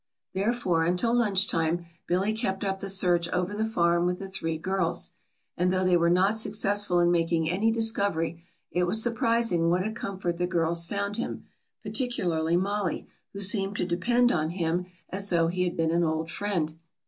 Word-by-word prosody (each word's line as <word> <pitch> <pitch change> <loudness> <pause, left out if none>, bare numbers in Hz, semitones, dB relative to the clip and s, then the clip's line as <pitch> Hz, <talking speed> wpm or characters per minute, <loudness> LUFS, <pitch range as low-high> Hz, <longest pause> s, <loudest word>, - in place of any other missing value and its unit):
Therefore 190 -4 +1
until 180 +8 +1
lunch 205 -5 +2
time 165 +1 0 0.2
Billy 190 +5 +1
kept 210 -4 -2
up 195 -1 -1
the 195 - +1
search 175 -3 +2
over 180 +2 -1
the 215 +1 -1
farm 175 -5 +2
with 180 0 -1
the 195 - -7
three 165 -4 -3
girls. 185 +1 -1 0.4
And 180 +1 +1
though 185 0 +1
they 180 -1 +4
were 170 0 +3
not 185 +5 +3
successful 205 -3 +1
in 175 0 +4
making 165 -1 +1
any 195 +7 +1
discovery 200 -7 0 0.3
it 180 0 +1
was 195 +5 +2
surprising 230 -7 +2
what 180 +2 +1
a 215 - -2
comfort 190 -6 -4
the 180 - +1
girls 170 -1 0
found 200 +2 -2
him, 235 - -4 0.4
particularly 175 - 0
Mollie, 200 0 -1 0.3
who 200 - -6
seemed 200 0 +1
to - - -1
depend 240 +8 +2
on 155 -1 0
him 175 0 -1 0.2
as 195 +1 0
though 165 -2 +2
he 180 +1 0
had 175 - -3
been 165 -1 +1
an 170 +1 +2
old 160 0 -1
friend. 165 -6 -2
180 Hz, 185 wpm, -27 LUFS, 170-205 Hz, 0.4 s, they